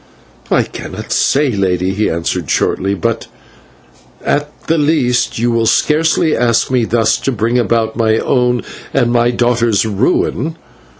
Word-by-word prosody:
"I - - +3
cannot - - -8
say, 140 -1 +2
Lady," 95 -3 0
he 105 +2 0
answered 85 -2 -3
shortly, 100 +1 0
"but 90 - -2 1.0
at 145 +1 0 0.2
the 165 0 +1
least 145 -5 +1
you 120 +1 +1
will 115 -1 +1
scarcely 160 +3 +2
ask 120 +1 +1
me 125 -3 +2
thus 115 -1 +1
to 135 - -2
bring 120 +1 0
about 115 -2 0
my 110 -1 +2
own 125 -1 +1 0.3
and 120 -3 +2
my 120 0 +3
daughter's 120 -3 +1
ruin. 125 +8 0
120 Hz, 140 wpm, -15 LUFS, 110-130 Hz, 1.0 s, I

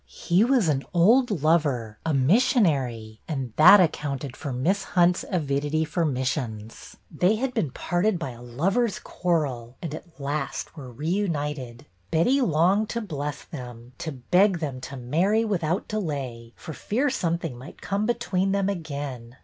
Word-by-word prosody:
He 180 +4 +1
was 245 -6 +3
an 140 -3 +1
old 230 +9 +5
lover, 140 -9 +1
a 160 - 0
missionary, 135 - +2
and 135 -7 -4
that 180 +7 +9
accounted 140 -6 -1
for 145 - -5
Miss 180 +11 0
Hunt's 180 -2 +2
avidity 150 -2 0
for 170 +2 -1
missions. 125 -5 -3
They 180 +7 +2
had 255 +3 -2
been 155 - 0
parted 175 +9 0
by 165 -6 -4
a 120 0 -12
lovers' 185 - 0
quarrel 135 -9 -2
and, 165 -4 -5
at 165 0 -10
last, 140 +1 -3
were 135 -5 -9
reunited. 150 - -3 0.2
Betty 250 - +3
longed 190 - +2
to 235 - -2
bless 150 -7 -5
them, 125 -5 -10
to 160 - -4
beg 180 +9 +3
them 140 -6 -4
to 140 - -7
marry 175 - +1
without 180 -3 -1
delay 135 - -4
for 160 - -8
fear 255 - -1
something 170 - -2
might 130 +6 -11
come 200 +2 -1
between 195 -5 0
them 200 0 +1
again. 140 -9 -5
155 Hz, 150 wpm, -25 LUFS, 130-190 Hz, 0.2 s, that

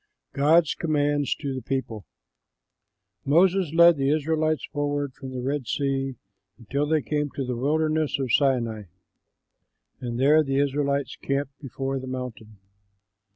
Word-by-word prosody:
GOD'S 155 +3 +4
COMMANDS 145 -3 0
TO 140 -3 -4
THE 130 - -4
PEOPLE 115 -5 -4 1.2
Moses 175 +3 +3
led 170 0 +6
the 135 0 +1
Israelites 155 -1 0
forward 145 -2 -2
from 135 0 -9
the 130 -1 -5
Red 135 -1 -2
Sea 135 -1 -1 0.4
until 140 +5 -2
they 155 -2 +1
came 150 -1 -1
to 135 - -2
the 125 -1 -3
wilderness 155 +4 0
of 130 -3 -2
Sinai, 120 -6 +1 1.1
and 120 -1 -4
there 150 +4 +5
the 135 -2 -1
Israelites 140 -1 0
camped 140 0 -2
before 135 0 -4
the 130 - -8
mountain. 120 -5 -7
140 Hz, 135 wpm, -25 LUFS, 130-150 Hz, 1.2 s, led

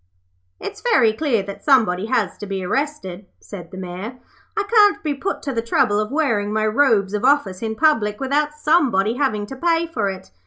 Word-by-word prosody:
'It's - - -7
very 440 - +3
clear 235 -5 0
that 200 0 -9
somebody 220 -8 +3
has 225 -7 0
to 205 - -8
be 195 -1 -4
arrested,' 200 -6 -3
said 175 -5 -10
the 190 - -10
Mayor. 185 +6 -6 0.4
'I 420 - +2
can't 415 -1 +4
be 300 -2 -1
put 285 +8 -4
to 275 - -3
the 230 - -1
trouble 225 -2 +1
of 215 0 -2
wearing 230 -9 0
my 215 0 0
robes 215 -4 +2
of 210 - -2
office 255 -9 +2
in 220 -1 -3
public 220 -8 +1
without 295 +3 0
somebody 275 - +2
having 215 -8 0
to 270 - -9
pay 335 +3 +1
for 225 -12 -2
it. 185 - -8
225 Hz, 195 wpm, -20 LUFS, 200-290 Hz, 0.4 s, can't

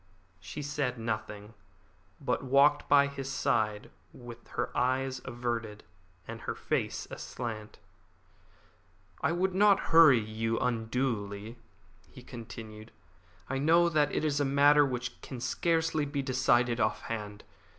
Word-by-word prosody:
She 150 - -7
said 140 -3 -2
nothing, 110 -2 -5 0.7
but - - -1
walked 140 +3 +3
by 140 -1 +6
his 135 -1 -5
side 105 -5 -1 0.2
with 120 -1 -12
her - - -2
eyes 130 0 0
averted 120 -4 -4 0.4
and - - -7
her - - -4
face - - -2
aslant. 110 -3 -6 1.4
"I 140 - +1
would 185 +2 0
not 200 +1 +5
hurry 160 -6 +8
you 110 +1 -2
unduly," 115 -2 -2 0.5
he - - -14
continued. 110 -2 -10 0.6
"I 135 0 -2
know 170 +4 +4
that 150 -3 +2
it - - -1
is 145 -2 0
a - - +2
matter 145 +2 +5
which 125 -1 -5
can 130 - -8
scarcely 160 +4 0
be 140 -1 -3
decided 125 -2 +2
off - - 0
hand. 105 -2 -6
125 Hz, 130 wpm, -30 LUFS, 115-145 Hz, 1.4 s, hurry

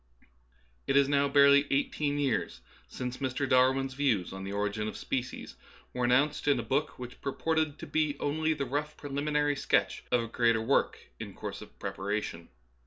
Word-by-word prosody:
It 135 - +3
is 140 -1 +5
now 140 0 +2
barely 140 0 +6
eighteen 145 +1 0
years 110 - -1 0.3
since 125 0 -5
Mr. 135 +1 -2
Dar 130 0 +5
win's 135 0 -3
views 130 -11 0
on 95 0 -6
the 100 - -5
origin 105 +1 -2
of - - -5
species 125 -2 -4 0.4
were 125 -1 0
an - - +2
nounced 145 +4 +2
in 140 -3 +4
a - - -3
book 140 +7 -1
which 125 0 -9
purported 155 +2 -1
to - - -8
be 155 -2 0
only 155 +2 0
the 140 -2 -2
rough 145 +4 -3
preliminary 145 +1 0
sketch - - 0
of 125 -1 +3
a - - -5
greater 115 0 +2
work 115 +5 +1 0.2
in - - -7
course - - -6
of - - -13
preparation. 95 -4 -4
135 Hz, 180 wpm, -30 LUFS, 120-145 Hz, 0.4 s, barely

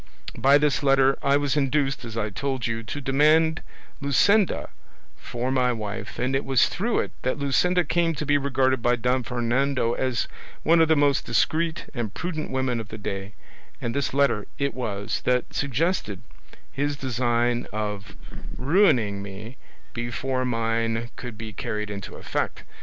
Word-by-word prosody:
"By 135 +4 +5
this 145 -1 +1
letter 135 -1 +4
I 140 0 +3
was 145 0 0
induced, 135 -1 +1
as 115 -1 -7
I 105 -1 -1
told 130 +3 -2
you, 115 -1 -2
to 115 +6 -6
demand 155 +4 +3 0.4
Luscinda 190 - +3 0.5
for 120 +2 -4
my 125 -1 +2
wife, 110 -1 -5
and 130 +2 0
it 135 - +1
was 135 -2 +3
through 225 +6 0
it - - -5
that 130 - -1
Luscinda 180 +6 +2
came 170 0 +1
to 150 - -3
be 145 0 +3
regarded 130 -2 +1
by 120 +1 +3
Don 125 +2 +1
Fernando 120 +1 0
as 130 -4 -1 0.4
one 165 +1 +5
of 160 - +5
the 160 - +4
most 145 -2 +3
discreet 160 0 +1
and 120 -6 -3
prudent 170 -3 -3
women 130 -2 -1
of 110 - -6
the 110 - -8
day, 100 0 -5 0.4
and 115 - -3
this 140 0 -1
letter 135 -7 +2
it 140 0 -1
was 105 -5 -3
that 125 -1 +1
suggested 140 - -1 0.5
his 145 +1 -1
design 120 -2 0
of 105 -1 -4 0.4
ruining 130 - +3
me 100 +5 -8 0.4
before 130 +2 -2
mine 115 -1 -1
could 120 -4 -8
be 110 -1 -7
carried 105 +1 -3
into 100 -1 -7
effect. - - -3
130 Hz, 160 wpm, -25 LUFS, 115-140 Hz, 0.5 s, By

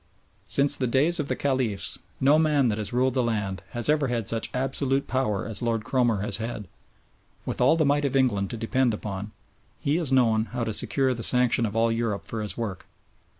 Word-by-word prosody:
Since 140 +7 +2
the 130 - -1
days 145 +8 +2
of 145 - -2
the - - -1
Caliphs 120 -8 0 0.2
no 145 +4 +4
man 150 -5 +2
that 105 0 -2
has 105 - -3
ruled 130 +1 +1
the 130 - +1
land 105 -6 -2
has 120 -1 -2
ever 150 -2 +2
had 120 -4 -2
such 115 -1 +2
absolute 135 +1 -1
power 110 -7 -1
as 110 -4 -3
Lord 115 -2 -1
Cromer 120 -5 +1
has 100 -1 +1
had. 110 -3 -5 0.8
With - - -3
all 130 +6 +5
the 160 -2 +2
might 145 +1 +2
of 140 - -1
England 105 -8 +1
to 115 - -5
depend 115 +1 0
upon, 100 -1 -6 0.5
he 145 +3 0
has 160 -6 -1
known 115 -4 +3
how 120 0 -4
to 110 -1 -2
secure 130 +4 +2
the 120 - -6
sanction 125 -1 +3
of 105 - -7
all 115 0 +2
Europe 115 -3 -2
for 115 - -5
his 105 - -4
work. 105 -6 -5
120 Hz, 210 wpm, -25 LUFS, 110-135 Hz, 0.8 s, all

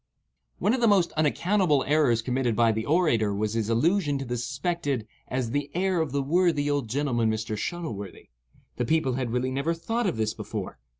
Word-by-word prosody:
One 210 - +1
of 255 - 0
the 235 - +4
most 195 -5 +4
unaccountable 155 0 +2
errors 140 -6 +3
committed 125 -2 0
by 115 0 +4
the 110 +1 -3
orator 120 - +2
was 105 +1 -1
his 115 -1 -1
allusion 145 - +2
to 135 - -4
the 120 0 -3
suspected 135 0 -2 0.2
as 125 -3 -2
"the 145 +1 -1
heir 185 -1 +1
of 155 -5 -2
the 140 0 0
worthy 155 -1 +2
old 140 -6 -1
gentleman 120 -3 +1
Mr. 110 0 -2
Shuttleworthy." 105 - -5 0.5
The 125 - 0
people 145 -1 +1
had 125 -1 -2
really 125 +2 -1
never 140 +6 -1
thought 225 +7 -1
of 175 - -1
this 110 0 0
before. - - -6
140 Hz, 190 wpm, -26 LUFS, 115-165 Hz, 0.5 s, the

